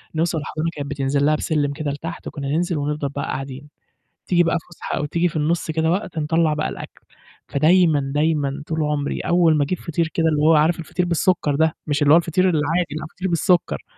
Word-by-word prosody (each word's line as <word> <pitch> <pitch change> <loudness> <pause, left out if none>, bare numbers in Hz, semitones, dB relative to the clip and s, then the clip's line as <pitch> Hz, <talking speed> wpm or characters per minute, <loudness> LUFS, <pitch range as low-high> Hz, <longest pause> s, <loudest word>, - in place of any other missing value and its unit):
نوصل 165 +1 0
الحضانة 155 +2 -3
كانت 140 -1 -5
بتنزل 140 0 0
لها 155 +1 +3
بسلِّم 145 -2 -1
كده 150 -1 -3
لتحت، 165 +4 -7
وكنا 140 -2 -5
ننزل 170 +3 0
ونفضل 145 0 -2
بقى 140 +1 -4
قاعدين، 135 +2 -6 0.6
تيجي 175 -1 +3
بقى 165 -1 +1
الفسحة 170 +1 -6
أو - - -2
تيجي 170 +4 +1
في 165 - -8
النُصّ 160 +2 0
كده 160 +1 +1
وقت 180 -2 -2
نطلَّع 160 0 +1
بقى 150 - -2
الأكل، - - -9 0.5
فدايمًا 160 +1 +4
دايمًا 145 -2 0
طول 160 -1 -2
عمري 150 -1 -2
أول 170 -2 +3
ما 150 - +2
أجيب 180 +5 -3
فطير 165 0 -2
كده 165 - +1
اللي 150 -1 +1
هو 160 +2 +5
عارف 160 +3 +3
الفطير 175 +2 -2
بالسُكّر 170 -3 +1
ده، 160 +2 +1
مش 145 0 0
اللي 145 - +5
هو - - +8
الفطير 170 +2 0
العادي، 165 +1 0
لأ 155 - -6
فطير 190 +1 -2
بالسُكّر، 170 - +1
155 Hz, 205 wpm, -21 LUFS, 145-170 Hz, 0.6 s, هو